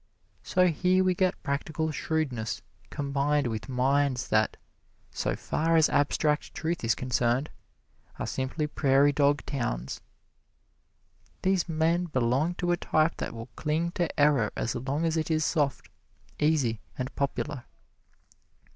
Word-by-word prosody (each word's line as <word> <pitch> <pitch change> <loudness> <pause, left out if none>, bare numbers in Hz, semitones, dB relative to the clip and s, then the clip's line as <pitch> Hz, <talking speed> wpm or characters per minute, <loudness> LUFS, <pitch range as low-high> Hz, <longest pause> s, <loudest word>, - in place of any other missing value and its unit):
So 185 - +2
here 185 +3 +2
we 185 0 +3
get 185 0 0
practical 155 +2 -2
shrewdness 145 -9 -2 0.3
combined 145 0 0
with 115 +1 -4
minds 130 0 +1
that, 110 0 +2 0.5
so - - -1
far 165 +1 0
as 160 -1 +5
abstract 150 +1 +1
truth 165 -1 -2
is 115 - +2
concerned, 125 +2 0 0.7
are - - -3
simply 130 +4 -2
prairie 140 -1 +3
dog 145 0 +2
towns. 70 - -3 1.4
These 185 -2 +1
men 165 +2 +1
belong 135 +3 +1
to 175 0 -1
a 175 - +2
type 155 0 +1
that - - -4
will 115 +2 -8
cling 160 +3 -1
to 175 -3 -2
error 145 -7 +4
as 115 - -1
long 135 +6 -2
as 165 0 +1
it 160 - -1
is 155 -1 +1
soft, 145 -6 0 0.5
easy 140 -8 +1 0.2
and 130 +1 -4
popular. 140 -1 -2
145 Hz, 135 wpm, -28 LUFS, 130-160 Hz, 1.4 s, as